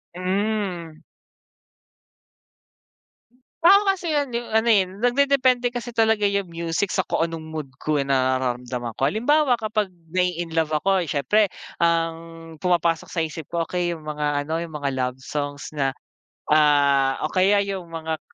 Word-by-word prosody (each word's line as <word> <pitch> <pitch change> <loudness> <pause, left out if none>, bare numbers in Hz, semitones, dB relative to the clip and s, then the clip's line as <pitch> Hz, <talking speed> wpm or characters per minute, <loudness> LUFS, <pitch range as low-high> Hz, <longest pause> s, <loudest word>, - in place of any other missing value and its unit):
Hmm. 185 -4 -2 2.6
Tao 395 +4 +8
kasi 360 -5 -1
yun 285 -2 0
yung 240 - -6
ano, 220 +1 +3
eh, 200 -4 +5
nagde-depende 245 +4 +2
kasi 240 0 -4
talaga 225 -2 +2
yung 200 -1 0
music 170 +2 -2
sa 190 - +2
kung 165 - 0
anong 165 -1 -6
mood 155 -3 -6
ko, 155 -1 0
eh, 140 - 0
nararamdaman 130 -2 -1
ko. 135 +5 +1
Halimbawa, 255 - +2
kapag 215 -2 -1 0.2
na-i-inlove 165 -4 0
ako, 190 +4 +1
eh, 165 - -5
siyempre 190 +10 +2 0.3
ang 165 -1 +2 0.5
pumapasok 170 -2 +1
sa 170 - -2
isip 155 -1 -8
ko 170 -1 -1
okey 175 0 -2
yung 155 - -15
mga 150 -1 -1
ano 160 +2 -2
yung 170 -2 -7
mga 145 -1 -2
love 125 0 -2
songs 145 +2 -5
na, 140 -3 0 0.6
ah, 140 -3 +4
o 155 - -2
kaya 200 +2 +3
yung 195 -3 -5
mga 160 -1 -4
170 Hz, 145 wpm, -23 LUFS, 150-210 Hz, 2.6 s, Tao